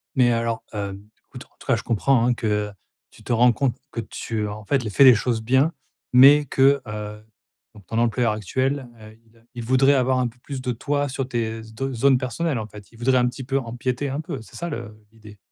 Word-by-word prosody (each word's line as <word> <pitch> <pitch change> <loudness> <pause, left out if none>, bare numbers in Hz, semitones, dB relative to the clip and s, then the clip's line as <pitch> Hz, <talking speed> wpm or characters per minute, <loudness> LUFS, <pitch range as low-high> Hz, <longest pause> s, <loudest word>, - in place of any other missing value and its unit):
Mais 125 -3 +4
alors, 115 -1 -1
hem, 100 -1 -5 0.2
écoute, - - -11
en - - -33
tout - - -15
cas - - +4
je - - -5
comprends 120 +2 +2
hein, 125 - +3
que 105 -3 -1 0.4
tu - - -18
te - - -5
rends 120 +2 +5
compte 125 +2 0 0.2
que 115 - -3
tu 110 -1 -4
en 105 0 -8
fait, 135 +3 +1
les 110 - -3
fais 135 - +4
les 130 -2 +9
choses 115 +1 -1
bien, 130 +7 +2 0.4
mais 140 +4 +8
que, 135 +1 +3
heu, 105 0 -7 0.5
donc 100 -3 -15
ton 115 - -4
employeur 120 -1 +1
actuel, 130 +5 -2
heu, 110 +1 -13
il 115 +1 -26
a - - -24
il 120 - -5
voudrait 130 +4 +4
avoir 130 -1 +2
un 125 - +1
peu 120 +1 -12
plus 135 -1 -6
de 125 - -2
toi 145 +4 -1
sur 135 -1 -3
tes 115 -3 -3
z 110 0 -14
do 135 +3 -3
zones 130 +2 +4
personnelles 130 +2 -2
en 110 - -5
fait? 105 -1 -14
Il 115 - -18
voudrait 130 +2 +2
un 125 - +2
petit 130 +2 -8
peu 135 +2 -1
empiéter 125 +3 -3
un 140 +3 -3
peu, 155 -6 -6
c'est 110 - -15
ça 170 - -4
le 110 -6 -8
l'idée? 105 -2 -15
120 Hz, 240 wpm, -23 LUFS, 110-135 Hz, 0.5 s, les